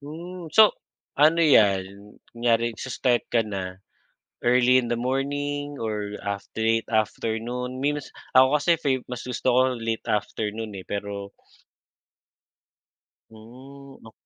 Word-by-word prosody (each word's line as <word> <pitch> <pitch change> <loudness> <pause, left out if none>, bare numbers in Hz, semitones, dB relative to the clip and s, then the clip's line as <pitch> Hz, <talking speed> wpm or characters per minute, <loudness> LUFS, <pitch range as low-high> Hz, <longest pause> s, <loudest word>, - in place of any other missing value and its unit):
Hmm, 170 +4 -8
so 220 -1 +8 0.5
ano 160 +3 +5
yan 100 -5 +2 0.2
kunyari 115 0 +1
sa 130 - -6
start 125 -1 0
ka 115 -1 +2
na, 95 -2 -6 0.6
early 125 +1 +4
in 120 - -5
the 120 - +1
morning 145 +3 -2
or 105 -2 -3
af 100 0 -4
late 115 0 +1
afternoon 115 +4 -2
means 145 -1 -1 0.3
ako 130 +1 +7
kasi 160 +4 +1
fave 130 -2 0
mas 125 - -5
gusto 125 - -4
ko 130 - +5 0.2
late 115 0 -3
afternoon 105 +1 -2
eh, - - -11
pero 100 -1 -5 2.0
Hmm, 135 +5 -14
nak 110 - -14
120 Hz, 125 wpm, -25 LUFS, 110-135 Hz, 2.0 s, so